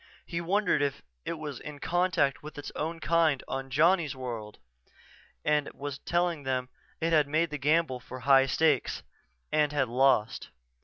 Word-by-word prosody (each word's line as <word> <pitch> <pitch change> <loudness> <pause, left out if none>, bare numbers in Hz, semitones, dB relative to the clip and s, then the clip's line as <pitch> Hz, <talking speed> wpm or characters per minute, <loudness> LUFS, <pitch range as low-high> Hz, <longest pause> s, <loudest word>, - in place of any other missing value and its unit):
He 170 -1 -3
wondered 195 -1 +1
if 140 -1 -1 0.2
it - - -2
was 150 -5 -6
in 150 -1 -8
contact 175 -4 +1
with 150 0 -10
its 145 - -6
own 165 +2 -3
kind 165 -5 +2
on 135 0 -4
Johnny's 155 +1 +3
World 115 -5 -6 0.9
and 150 -1 +1
was 140 -1 -6
telling 175 -2 0
them 130 -2 -2 0.3
it 165 0 0
had 150 -2 +4
made 160 +2 +1
the 150 - -4
gamble 150 -2 +2
for 125 +1 -9
high 135 +1 +5
stakes, 150 -1 +1 0.5
and 150 -1 +2
had 140 -4 0
lost. 125 -3 +2
145 Hz, 160 wpm, -29 LUFS, 135-165 Hz, 0.9 s, high